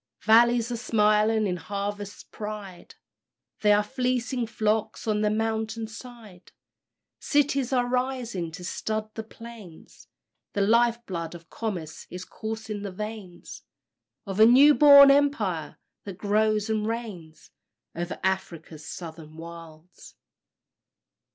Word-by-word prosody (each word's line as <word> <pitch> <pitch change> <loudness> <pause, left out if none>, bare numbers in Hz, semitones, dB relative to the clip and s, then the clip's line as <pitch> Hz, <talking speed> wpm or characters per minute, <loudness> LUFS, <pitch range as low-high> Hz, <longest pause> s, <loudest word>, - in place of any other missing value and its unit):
Valleys 235 +2 +4
are 240 - -2
smiling 215 -1 +2
in 180 -2 -1
harvest 200 +1 -6
pride; 210 -4 -8 0.6
There 210 -1 +4
are 210 - +2
fleecy 250 0 -1
flocks 215 -1 -1
on 210 -1 0
the 210 - +2
mountain 220 +1 -2
side; 220 -4 -12 0.7
Cities 280 -3 +1
are 250 -2 +2
rising 245 -8 -2
to 180 +1 -8
stud 215 +3 -4
the 220 - -5
plains; 225 -6 -13 0.5
The 200 - 0
life 235 +3 +3
blood 170 -2 -5
of 165 -1 -14
commerce 180 -9 -5
is 180 0 -7
coursing 220 -1 -6
the 200 -1 -5
veins 210 -2 -8 0.6
Of 195 0 -5
a 220 - +9
new 275 +5 +7
born 280 -1 +9
Empire, 220 - +1 0.3
that 195 -3 -7
grows 215 +1 +1
and 215 -1 -1
reigns 190 -9 -6 0.4
Over 175 +1 -5
Afric's 170 -5 -3
Southern 160 -2 -9
Wilds. 165 0 -12
215 Hz, 120 wpm, -26 LUFS, 185-230 Hz, 0.7 s, a